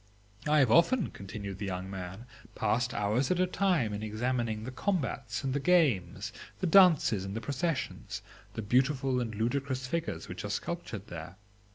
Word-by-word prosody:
I 150 Hz, +1 st, +4 dB
have 135 Hz, -6 st, +5 dB
often, 200 Hz, -, +4 dB
continued 100 Hz, 0 st, -7 dB
the 100 Hz, -, -3 dB
young 90 Hz, 0 st, -3 dB
man, 95 Hz, +3 st, -7 dB, 0.3 s
'passed 120 Hz, +1 st, +1 dB
hours 105 Hz, +6 st, +1 dB
at 180 Hz, -, +1 dB
a 185 Hz, -, +4 dB
time 180 Hz, -, +1 dB
in 105 Hz, -, -4 dB
examining 110 Hz, 0 st, -1 dB
the 130 Hz, -, -5 dB
combats 135 Hz, -, -2 dB
and 135 Hz, -1 st, -1 dB
the 140 Hz, -, +1 dB
games, 140 Hz, -, +2 dB, 0.3 s
the -, -, -1 dB
dances 165 Hz, -, +6 dB
and 95 Hz, +1 st, -5 dB
the -, -, -1 dB
processions, 145 Hz, +4 st, -3 dB, 0.3 s
the 110 Hz, -, -3 dB
beautiful 130 Hz, +3 st, +2 dB
and 115 Hz, -3 st, -3 dB
ludicrous 130 Hz, +4 st, -1 dB
figures 130 Hz, -, -3 dB
which 90 Hz, -, -6 dB
are 100 Hz, -, -4 dB
sculptured 110 Hz, -, -4 dB
there. 85 Hz, +2 st, -7 dB
125 Hz, 170 wpm, -31 LUFS, 105-150 Hz, 0.3 s, dances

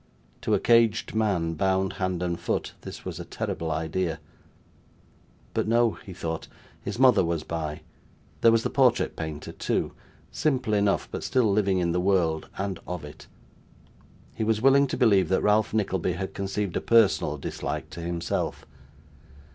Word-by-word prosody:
To -, -, +2 dB
a -, -, +1 dB
caged 115 Hz, -2 st, +3 dB
man, 100 Hz, -7 st, +1 dB
bound 95 Hz, +3 st, +1 dB
hand 90 Hz, -1 st, -1 dB
and 85 Hz, -1 st, -2 dB
foot, 85 Hz, -, -2 dB
this -, -, -9 dB
was -, -, -5 dB
a -, -, -4 dB
terrible 80 Hz, 0 st, -4 dB
idea 80 Hz, +1 st, -2 dB, 1.3 s
but -, -, 0 dB
no, 115 Hz, 0 st, +3 dB
he 100 Hz, -, -11 dB
thought, 80 Hz, -2 st, -4 dB, 0.3 s
his -, -, -5 dB
mother 125 Hz, -6 st, +6 dB
was 85 Hz, -2 st, -1 dB
by; 80 Hz, -2 st, -4 dB, 0.6 s
there 115 Hz, -, +7 dB
was 115 Hz, 0 st, +3 dB
the -, -, -2 dB
portrait 125 Hz, -3 st, +3 dB
painter, 80 Hz, -2 st, -5 dB
too -, -, -2 dB, 0.4 s
simple 130 Hz, -8 st, 0 dB
enough, 100 Hz, -1 st, +2 dB
but -, -, -4 dB
still 120 Hz, -5 st, +2 dB
living 100 Hz, -2 st, +2 dB
in 85 Hz, -2 st, +1 dB
the 90 Hz, +1 st, 0 dB
world, 90 Hz, -5 st, +1 dB
and 95 Hz, -1 st, -3 dB
of 90 Hz, -4 st, -5 dB
it. 75 Hz, -, -12 dB, 1.1 s
He -, -, -3 dB
was 110 Hz, 0 st, +1 dB
willing 135 Hz, +3 st, +5 dB
to -, -, -3 dB
believe 100 Hz, -6 st, +4 dB
that 95 Hz, -, +2 dB
Ralph 105 Hz, +1 st, +3 dB
Nickleby 95 Hz, -4 st, 0 dB
had 95 Hz, +2 st, -5 dB
conceived 100 Hz, -1 st, -3 dB
a -, -, 0 dB
personal 105 Hz, -9 st, +3 dB
dislike 70 Hz, -, -5 dB
to 85 Hz, -, -7 dB
himself. 85 Hz, 0 st, -3 dB
95 Hz, 165 wpm, -26 LUFS, 85-110 Hz, 1.3 s, there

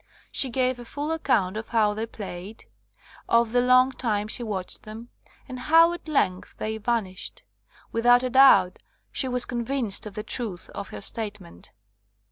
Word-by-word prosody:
She 265 Hz, -, +3 dB
gave 255 Hz, 0 st, 0 dB
a -, -, -8 dB
full 290 Hz, +5 st, -4 dB
account 210 Hz, -11 st, 0 dB
of 220 Hz, -, -6 dB
how 215 Hz, -3 st, +2 dB
they 220 Hz, +2 st, -4 dB
played, 200 Hz, -1 st, -9 dB, 0.6 s
of 230 Hz, -1 st, +3 dB
the 245 Hz, +1 st, +3 dB
long 255 Hz, +1 st, +5 dB
time 215 Hz, -5 st, -2 dB
she 235 Hz, -, -1 dB
watched 200 Hz, -5 st, -5 dB
them, 220 Hz, +3 st, -10 dB, 0.4 s
and 255 Hz, -2 st, -7 dB
how 330 Hz, +6 st, +5 dB
at 345 Hz, -, -9 dB
length 185 Hz, -12 st, -1 dB
they 220 Hz, 0 st, -4 dB
vanished. 215 Hz, -4 st, -2 dB, 0.5 s
Without 245 Hz, +2 st, +4 dB
a 255 Hz, -, -2 dB
doubt 245 Hz, -9 st, +6 dB, 0.3 s
she 265 Hz, -, 0 dB
was 250 Hz, -1 st, +1 dB
convinced 235 Hz, -4 st, 0 dB
of 200 Hz, -, -10 dB
the 210 Hz, -, -4 dB
truth 215 Hz, -8 st, -4 dB
of 200 Hz, -, -7 dB
her -, -, -8 dB
statement. 205 Hz, -, -4 dB
230 Hz, 165 wpm, -25 LUFS, 210-255 Hz, 0.6 s, doubt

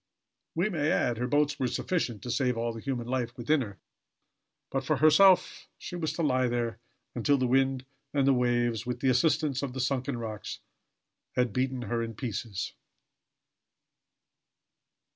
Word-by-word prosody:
We 175 Hz, +5 st, +2 dB
may 155 Hz, -6 st, 0 dB
add: 120 Hz, -2 st, +1 dB
Her 125 Hz, -, 0 dB
boats 145 Hz, +2 st, +1 dB
were 130 Hz, -, +1 dB
sufficient 120 Hz, -, -2 dB
to 125 Hz, -, -3 dB
save 125 Hz, -1 st, +1 dB
all 115 Hz, 0 st, -1 dB
the 115 Hz, -, -8 dB
human 125 Hz, -3 st, -3 dB
life 120 Hz, -1 st, -2 dB
within 140 Hz, +5 st, +2 dB
her, 100 Hz, -5 st, -6 dB, 0.9 s
but 135 Hz, 0 st, -1 dB
for -, -, +1 dB
herself, 185 Hz, +5 st, +5 dB
she -, -, -7 dB
was 160 Hz, -3 st, -1 dB
to 170 Hz, -, -2 dB
lie 130 Hz, -3 st, +2 dB
there 120 Hz, -2 st, -2 dB, 0.3 s
until 140 Hz, +4 st, +2 dB
the 130 Hz, -, +1 dB
winds 130 Hz, +1 st, +2 dB, 0.3 s
and 135 Hz, -2 st, +3 dB
waves, 120 Hz, -2 st, +1 dB
with 125 Hz, -1 st, -4 dB
the 135 Hz, -, +3 dB
assistance 135 Hz, +1 st, +2 dB
of 140 Hz, -3 st, -3 dB
the 130 Hz, -, -5 dB
sunken 130 Hz, 0 st, -1 dB
rocks, 110 Hz, -2 st, -5 dB, 0.8 s
had 125 Hz, -4 st, +1 dB
beaten 130 Hz, 0 st, -1 dB
her 115 Hz, +1 st, -1 dB
in 115 Hz, -1 st, -4 dB
pieces. 110 Hz, -3 st, -4 dB
125 Hz, 160 wpm, -29 LUFS, 120-140 Hz, 0.9 s, herself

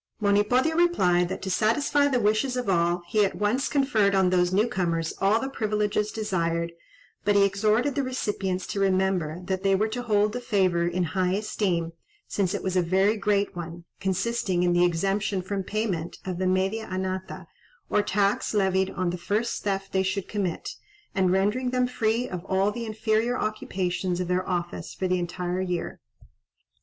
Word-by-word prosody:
Monipodio 210 Hz, +9 st, +2 dB
replied, 180 Hz, -, +3 dB
that, -, -, -5 dB
to 190 Hz, -, -2 dB
satisfy 280 Hz, +9 st, +2 dB
the 265 Hz, -3 st, +1 dB
wishes 220 Hz, +4 st, +1 dB
of 250 Hz, -, -2 dB
all, 175 Hz, -1 st, +1 dB
he 210 Hz, +4 st, +2 dB
at 195 Hz, -, 0 dB
once 215 Hz, +6 st, 0 dB
conferred 225 Hz, -8 st, +2 dB
on 190 Hz, -1 st, +3 dB
those 180 Hz, -1 st, +2 dB
new 205 Hz, +5 st, +3 dB
comers 170 Hz, -6 st, -1 dB
all 200 Hz, +3 st, +4 dB
the 270 Hz, -, -3 dB
privileges 210 Hz, -3 st, -1 dB
desired, 170 Hz, -6 st, -1 dB, 0.5 s
but 205 Hz, -, +2 dB
he 200 Hz, -, +6 dB
exhorted 215 Hz, +7 st, +1 dB
the 280 Hz, -, 0 dB
recipients 205 Hz, -8 st, -2 dB
to 200 Hz, -, -4 dB
remember 185 Hz, -4 st, +1 dB
that 190 Hz, 0 st, -2 dB
they 195 Hz, 0 st, +3 dB
were 215 Hz, +3 st, +1 dB
to 235 Hz, +3 st, -4 dB
hold 210 Hz, -3 st, +2 dB
the 245 Hz, -, -3 dB
favour 185 Hz, -7 st, +1 dB
in 180 Hz, +1 st, 0 dB
high 180 Hz, +2 st, 0 dB
esteem, 185 Hz, -5 st, -1 dB, 0.3 s
since 190 Hz, -3 st, 0 dB
it -, -, -4 dB
was 190 Hz, -1 st, -1 dB
a 180 Hz, -, +4 dB
very 190 Hz, +5 st, +2 dB
great 205 Hz, -2 st, 0 dB
one: 170 Hz, 0 st, -7 dB, 0.2 s
consisting 190 Hz, -1 st, 0 dB
in 175 Hz, -1 st, +3 dB
the 175 Hz, 0 st, +4 dB
exemption 195 Hz, +3 st, 0 dB
from 195 Hz, +2 st, -3 dB
payment 190 Hz, -5 st, -3 dB
of 180 Hz, -2 st, -4 dB
the 185 Hz, -, +1 dB
media 190 Hz, +4 st, 0 dB
anata, 185 Hz, 0 st, -4 dB, 0.4 s
or 210 Hz, -, +2 dB
tax 200 Hz, +2 st, 0 dB
levied 190 Hz, -1 st, +2 dB
on 185 Hz, -1 st, -2 dB
the 180 Hz, -, -5 dB
first 210 Hz, +7 st, -1 dB
theft 195 Hz, -1 st, -2 dB
they 190 Hz, -, +2 dB
should 190 Hz, 0 st, -2 dB
commit, 195 Hz, -5 st, -3 dB, 0.4 s
and 190 Hz, -2 st, +2 dB
rendering 210 Hz, +7 st, +1 dB
them 250 Hz, 0 st, +1 dB
free 240 Hz, -1 st, 0 dB
of 180 Hz, -2 st, -6 dB
all 195 Hz, +2 st, +1 dB
the 235 Hz, +1 st, -5 dB
inferior 220 Hz, +2 st, 0 dB
occupations 185 Hz, -4 st, -2 dB
of 180 Hz, -, -2 dB
their 180 Hz, +1 st, -1 dB
office 175 Hz, -1 st, -3 dB
for 185 Hz, -, -1 dB
the 180 Hz, 0 st, +1 dB
entire 180 Hz, +1 st, -3 dB
year. 180 Hz, -2 st, -3 dB
195 Hz, 180 wpm, -26 LUFS, 180-215 Hz, 0.5 s, he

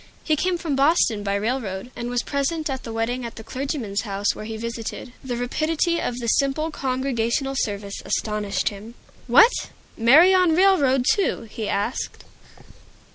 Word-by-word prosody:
He 310 Hz, -, +2 dB
came 360 Hz, +4 st, 0 dB
from 320 Hz, -4 st, -2 dB
Boston 275 Hz, -6 st, +3 dB
by 200 Hz, -1 st, -1 dB
railroad, 215 Hz, -1 st, -3 dB
and 240 Hz, 0 st, -4 dB
was 245 Hz, -1 st, -1 dB
present 300 Hz, +2 st, -1 dB
at 265 Hz, -1 st, -4 dB
the 230 Hz, -, -7 dB
wedding 230 Hz, +3 st, -2 dB
at 235 Hz, -1 st, -6 dB
the 220 Hz, -, -9 dB
clergyman's 255 Hz, -5 st, -3 dB
house 200 Hz, -1 st, -1 dB
where 215 Hz, -, -8 dB
he 220 Hz, 0 st, -5 dB
visited. 230 Hz, +2 st, -6 dB
The 245 Hz, -2 st, -3 dB
rapidity 315 Hz, +7 st, 0 dB
of 240 Hz, -, -2 dB
the 245 Hz, -, -5 dB
simple 275 Hz, +6 st, +1 dB
Congregational 260 Hz, -1 st, -1 dB
service 200 Hz, -1 st, -3 dB
astonished 210 Hz, -2 st, -1 dB
him. 215 Hz, +3 st, -11 dB, 0.3 s
"What? 475 Hz, +1 st, +5 dB, 0.3 s
Marry 300 Hz, +11 st, +6 dB
on 365 Hz, -4 st, +4 dB
railroad, 295 Hz, -9 st, +4 dB
too?" 405 Hz, -3 st, 0 dB
he 220 Hz, -2 st, -4 dB
asked. 205 Hz, +5 st, -3 dB
250 Hz, 160 wpm, -23 LUFS, 225-300 Hz, 0.3 s, Marry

